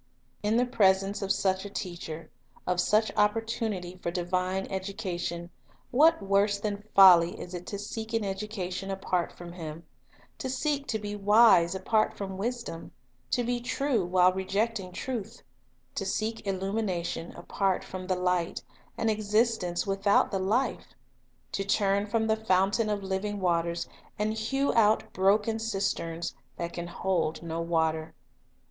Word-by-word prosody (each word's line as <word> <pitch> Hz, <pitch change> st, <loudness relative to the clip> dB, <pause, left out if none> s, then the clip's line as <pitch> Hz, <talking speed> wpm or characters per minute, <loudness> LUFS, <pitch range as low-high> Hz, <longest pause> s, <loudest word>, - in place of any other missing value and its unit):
In 210 Hz, +2 st, +2 dB
the 250 Hz, -, +3 dB
presence 195 Hz, -4 st, +2 dB
of 195 Hz, -1 st, 0 dB
such 190 Hz, -1 st, +1 dB
a 205 Hz, -, -6 dB
Teacher, 170 Hz, -4 st, -6 dB, 0.3 s
of 180 Hz, 0 st, 0 dB
such 215 Hz, +3 st, +2 dB
oppor 210 Hz, +2 st, +2 dB
tunity 190 Hz, -6 st, -4 dB
for -, -, -1 dB
divine 185 Hz, +2 st, -1 dB
education, 185 Hz, -3 st, -4 dB, 0.4 s
what 300 Hz, -1 st, +5 dB
worse 200 Hz, +1 st, +2 dB
than 205 Hz, 0 st, -3 dB
folly 180 Hz, -3 st, +8 dB
is 180 Hz, -, -8 dB
it 180 Hz, 0 st, -6 dB
to 200 Hz, -, -4 dB
seek 220 Hz, +2 st, -6 dB
an 225 Hz, -2 st, +1 dB
education 195 Hz, -1 st, -4 dB
apart 185 Hz, -2 st, -1 dB
from 175 Hz, -1 st, -10 dB
Him, 165 Hz, -2 st, -7 dB, 0.3 s
— 125 Hz, 0 st, -30 dB
to 260 Hz, -, -3 dB
seek 285 Hz, +1 st, -1 dB
to 220 Hz, -, 0 dB
be 205 Hz, -1 st, -5 dB
wise 205 Hz, -4 st, +5 dB
apart 215 Hz, +3 st, +1 dB
from 190 Hz, -1 st, -5 dB
Wisdom; 235 Hz, -6 st, -4 dB, 0.4 s
to 245 Hz, -, +1 dB
be 240 Hz, +1 st, -1 dB
true 245 Hz, -2 st, 0 dB
while 180 Hz, +1 st, +4 dB
rejecting 195 Hz, +1 st, -1 dB
Truth; 235 Hz, +1 st, -5 dB, 0.5 s
to -, -, -2 dB
seek 215 Hz, +2 st, -2 dB
illumination 190 Hz, -3 st, -2 dB
apart 190 Hz, +2 st, -1 dB
from 185 Hz, -1 st, -7 dB
the 185 Hz, -, +1 dB
Light, 180 Hz, -2 st, 0 dB, 0.3 s
and 225 Hz, -, 0 dB
existence 215 Hz, -4 st, +1 dB
without 195 Hz, +1 st, +2 dB
the 195 Hz, -, 0 dB
Life; 215 Hz, +8 st, -1 dB, 0.6 s
to 195 Hz, -, -1 dB
turn 200 Hz, 0 st, +1 dB
from 220 Hz, +1 st, +1 dB
the 220 Hz, 0 st, +2 dB
Fountain 200 Hz, +2 st, +2 dB
of 205 Hz, -1 st, -1 dB
living 195 Hz, +2 st, -2 dB
waters, 170 Hz, -2 st, 0 dB, 0.3 s
and 215 Hz, +1 st, 0 dB
hew 270 Hz, +6 st, 0 dB
out 220 Hz, -1 st, +3 dB
broken 205 Hz, +4 st, +2 dB
cisterns, 195 Hz, -6 st, -2 dB, 0.2 s
that 170 Hz, 0 st, -4 dB
can 175 Hz, 0 st, -5 dB
hold 170 Hz, -3 st, -1 dB
no 165 Hz, 0 st, -3 dB
water. 160 Hz, -1 st, 0 dB
195 Hz, 150 wpm, -28 LUFS, 180-215 Hz, 0.6 s, folly